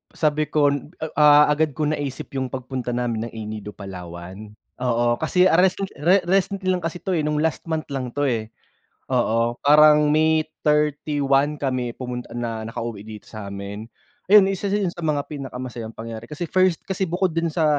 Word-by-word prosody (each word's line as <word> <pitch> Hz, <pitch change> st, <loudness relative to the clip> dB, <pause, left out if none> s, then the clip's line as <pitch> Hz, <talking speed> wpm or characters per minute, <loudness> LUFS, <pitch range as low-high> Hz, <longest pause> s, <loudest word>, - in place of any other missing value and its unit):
sabi 155 Hz, -1 st, +1 dB
ko, 145 Hz, -2 st, +3 dB, 0.5 s
ah, 150 Hz, 0 st, +8 dB
agad 150 Hz, -2 st, +1 dB
ko 155 Hz, -, -1 dB
naisip 145 Hz, -3 st, -3 dB
yung 130 Hz, -1 st, -1 dB
pagpunta 130 Hz, -2 st, -4 dB
namin 115 Hz, -2 st, -2 dB
ng -, -, -13 dB
El 110 Hz, -1 st, -5 dB
Nido, 105 Hz, -1 st, -7 dB
Palawan. 95 Hz, +2 st, -9 dB, 0.3 s
Oo, 120 Hz, -1 st, +1 dB
kasi 180 Hz, +3 st, +3 dB
ah, 175 Hz, -1 st, +4 dB
recen 190 Hz, +1 st, +2 dB
re 180 Hz, +6 st, +4 dB
recently 195 Hz, +1 st, +1 dB
lang 180 Hz, -1 st, 0 dB
kasi 165 Hz, +1 st, -3 dB
'to 190 Hz, -, -2 dB
eh, 165 Hz, -, +1 dB
nung 150 Hz, 0 st, 0 dB
last 160 Hz, -, 0 dB
month 160 Hz, -1 st, -2 dB
lang 130 Hz, -3 st, -3 dB
'to 145 Hz, -, -1 dB
eh, 115 Hz, -5 st, -1 dB, 0.6 s
oo, 115 Hz, +1 st, +1 dB
parang 150 Hz, +1 st, +6 dB
May 155 Hz, 0 st, +3 dB, 0.2 s
31 150 Hz, -1 st, +1 dB
kami 130 Hz, -3 st, -1 dB
pumunt 125 Hz, -1 st, -6 dB
na 115 Hz, -2 st, -4 dB
nakauwi 115 Hz, -2 st, -5 dB
dito 105 Hz, -1 st, -10 dB
sa'min. 100 Hz, 0 st, -7 dB, 0.4 s
Ayun, 195 Hz, 0 st, +7 dB
isa 195 Hz, +1 st, -3 dB
yun 200 Hz, -2 st, 0 dB
sa 170 Hz, -2 st, -6 dB
mga 145 Hz, -2 st, +1 dB
pinakamasayang 125 Hz, -5 st, -6 dB
pangyayari, 115 Hz, 0 st, -7 dB
kasi 150 Hz, +4 st, -6 dB
first 185 Hz, -3 st, +2 dB
kasi 190 Hz, -1 st, -2 dB
bukod 180 Hz, +2 st, 0 dB
dun 165 Hz, +1 st, -1 dB
sa, 155 Hz, -2 st, +2 dB
145 Hz, 175 wpm, -23 LUFS, 115-160 Hz, 0.6 s, ah